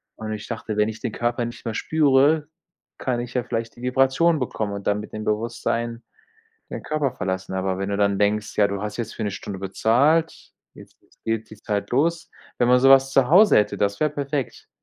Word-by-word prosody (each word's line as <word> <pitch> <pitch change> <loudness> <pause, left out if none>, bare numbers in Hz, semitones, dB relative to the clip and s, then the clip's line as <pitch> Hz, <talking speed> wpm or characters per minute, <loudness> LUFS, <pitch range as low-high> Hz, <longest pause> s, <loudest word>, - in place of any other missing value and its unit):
und 110 0 -6
ich 105 0 -7
dachte, 110 -2 -5
wenn 105 +1 +2
ich 110 0 -7
den - - -3
Körper 120 +2 -1
nicht 120 - -9
mehr 115 - -2
spüre, 150 +2 +3 0.5
kann 125 -2 -2
ich 120 0 -6
ja 125 - 0
vielleicht 115 -1 -4
die 120 - -14
Vibration 135 +6 +2
bekommen 110 -4 -3
und 100 -1 -6
dann 105 0 +1
mit 105 - -9
dem 110 - -5
Bewusstsein 115 +2 -2 0.7
den - - -6
Körper 150 -4 -1
verlassen, 95 0 -4
aber 95 0 -1
wenn 95 +1 -3
du 100 - -1
dann 100 -1 +1
denkst, 105 +1 0
ja, 105 - +5
du 100 0 -4
hast 105 0 -4
jetzt 115 -2 -5
für - - -5
'ne 105 - -1
Stunde 100 0 -7
bezahlt, 125 - +1 0.2
jetzt - - -15
jetzt - - -31
geht 110 -1 -2
die 110 - -11
Zeit 105 -1 -2
los. 165 +6 0 0.3
Wenn 120 - +3
man 125 0 +5
so 135 +1 +5
was 135 0 +6
zu 135 -2 +3
Hause 200 +6 +7
hätte, 105 -1 0
das 100 0 0
wäre 150 -1 +2
perfekt. 140 -3 -4
115 Hz, 220 wpm, -23 LUFS, 105-135 Hz, 0.7 s, Hause